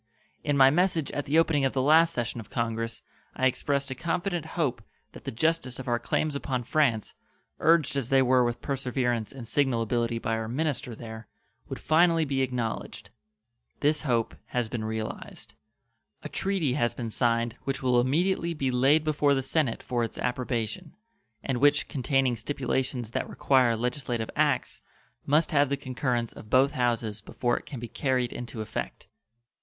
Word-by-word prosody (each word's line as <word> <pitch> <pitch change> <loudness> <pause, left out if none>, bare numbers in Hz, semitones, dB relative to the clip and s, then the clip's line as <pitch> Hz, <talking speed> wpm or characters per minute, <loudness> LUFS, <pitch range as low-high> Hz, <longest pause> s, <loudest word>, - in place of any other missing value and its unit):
In 145 -1 +1
my 135 0 +7
message 170 -2 +1
at 145 - -4
the 150 +3 +2
opening 160 -3 +3
of 135 - +1
the 135 - 0
last 160 +3 +5
session 120 -4 -3
of 110 - -9
Congress 115 -1 -2 0.3
I 130 - 0
expressed 140 +1 0
a - - 0
confident 170 +3 -2
hope 150 -7 0 0.3
that - - -13
the - - -3
justice 145 0 0
of 130 - -7
our 120 -1 +1
claims 150 +5 -1
upon 130 -3 -2
France, 125 -4 +1 0.5
urged 165 -4 +3
as 135 -3 -1
they 135 -1 +5
were 130 0 +4
with 120 -1 -2
perseverance 125 -4 -1
and 130 -4 -9
signal 135 -4 +1
ability 115 +1 0
by 115 0 -2
our 110 0 -3
minister 130 -2 -2
there, 110 -1 -9 0.4
would - - -5
finally 165 +1 +3
be 135 -2 0
acknowledged. 125 -3 -3 0.7
This 150 +1 +2
hope 120 -5 0
has 120 -2 -1
been 110 -1 -4
realized. 110 0 -5 0.7
A - - -5
treaty 190 -9 0
has 120 -4 0
been 115 -3 -4
signed 115 0 +1
which 135 0 -2
will 125 -1 +4
immediately 170 +5 +1
be 135 -3 -1
laid 135 +5 +4
before 150 -2 +2
the 135 - -1
Senate 135 -4 0
for 120 -1 -1
its 115 - -5
approbation, 125 - -3 0.5
and 130 -3 -1
which, 145 +2 +4
containing 135 -2 +1
stipulations 130 -1 -2
that - - -2
require 130 -4 +3
legislative 120 -1 -2
acts, - - +1 0.5
must 150 +5 +3
have 145 -3 +3
the 140 - 0
concurrence 125 -3 -2
of 105 - -12
both 130 +3 +4
houses 115 -4 -1
before 120 +3 -1
it - - -21
can 135 - -6
be 120 - -6
carried 125 -1 -1
into 120 -2 -6
effect. 110 - -5
130 Hz, 170 wpm, -27 LUFS, 120-145 Hz, 0.7 s, my